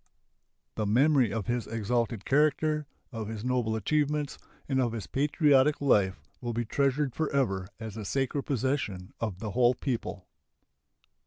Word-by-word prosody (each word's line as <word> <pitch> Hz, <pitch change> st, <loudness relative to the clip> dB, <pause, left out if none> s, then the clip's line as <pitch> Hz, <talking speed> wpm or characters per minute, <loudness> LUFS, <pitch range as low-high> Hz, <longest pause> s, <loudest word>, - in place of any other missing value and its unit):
The 105 Hz, -2 st, 0 dB
memory 130 Hz, +1 st, +4 dB
of 110 Hz, -2 st, -2 dB
his 120 Hz, -1 st, -1 dB
exalted 115 Hz, 0 st, -1 dB
character, 150 Hz, +1 st, +2 dB, 0.2 s
of 110 Hz, -4 st, -5 dB
his 110 Hz, +1 st, -5 dB
noble 125 Hz, -3 st, +1 dB
achievements, 150 Hz, +5 st, 0 dB, 0.3 s
and 130 Hz, -2 st, +1 dB
of 120 Hz, -2 st, 0 dB
his 110 Hz, -4 st, -4 dB
patriotic 145 Hz, 0 st, +3 dB
life 100 Hz, -9 st, +3 dB, 0.2 s
will 120 Hz, -1 st, -3 dB
be 120 Hz, +1 st, -1 dB
treasured 140 Hz, +2 st, +1 dB
forever 130 Hz, -12 st, 0 dB
as 110 Hz, -3 st, -6 dB
a 110 Hz, -, -4 dB
sacred 135 Hz, +6 st, -1 dB
possession 130 Hz, -8 st, -1 dB
of 110 Hz, -6 st, -3 dB
the 105 Hz, +1 st, -5 dB
whole 125 Hz, +2 st, +4 dB
people. 115 Hz, -8 st, -3 dB
125 Hz, 145 wpm, -29 LUFS, 110-140 Hz, 0.3 s, memory